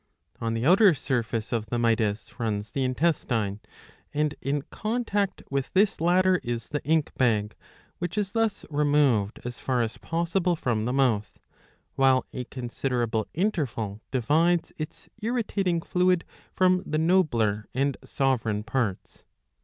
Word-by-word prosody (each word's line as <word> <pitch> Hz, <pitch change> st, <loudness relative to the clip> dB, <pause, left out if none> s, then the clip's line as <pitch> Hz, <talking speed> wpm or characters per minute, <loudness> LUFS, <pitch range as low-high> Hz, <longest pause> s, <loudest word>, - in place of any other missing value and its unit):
On 115 Hz, 0 st, -1 dB
the 115 Hz, +2 st, -1 dB
outer 185 Hz, +2 st, +6 dB
surface 115 Hz, -5 st, -2 dB
of 115 Hz, -3 st, -1 dB
the 120 Hz, -, -2 dB
mytis 115 Hz, -1 st, 0 dB
runs 105 Hz, -2 st, -2 dB
the 135 Hz, -, -1 dB
intestine; 125 Hz, -7 st, 0 dB, 0.5 s
and 150 Hz, 0 st, 0 dB
in 140 Hz, 0 st, -1 dB
contact 215 Hz, -3 st, -1 dB
with 140 Hz, -1 st, -1 dB
this 195 Hz, -3 st, +3 dB
latter 180 Hz, +2 st, +3 dB
is 120 Hz, -1 st, -4 dB
the 145 Hz, -, -3 dB
ink 155 Hz, -1 st, +1 dB
bag, 105 Hz, -4 st, +2 dB, 0.5 s
which 175 Hz, +3 st, -4 dB
is 200 Hz, -2 st, 0 dB
thus 225 Hz, -2 st, 0 dB
removed 145 Hz, -8 st, +2 dB
as 125 Hz, 0 st, -5 dB
far 130 Hz, -2 st, 0 dB
as 115 Hz, 0 st, -5 dB
possible 170 Hz, +2 st, 0 dB
from 115 Hz, -8 st, -1 dB
the 125 Hz, -, 0 dB
mouth, 125 Hz, -6 st, +1 dB, 0.6 s
while 130 Hz, -1 st, +4 dB
a 125 Hz, -, -4 dB
considerable 120 Hz, -3 st, -2 dB
interval 130 Hz, -, -1 dB
divides 160 Hz, +7 st, +2 dB
its 155 Hz, -, -6 dB
irritating 205 Hz, -7 st, 0 dB
fluid 180 Hz, -1 st, +2 dB, 0.3 s
from 185 Hz, -1 st, +3 dB
the 155 Hz, -, -2 dB
nobler 130 Hz, -, +2 dB
and 135 Hz, 0 st, +1 dB
sovereign 125 Hz, -6 st, 0 dB
parts. 110 Hz, -5 st, -3 dB
135 Hz, 140 wpm, -26 LUFS, 115-175 Hz, 0.6 s, outer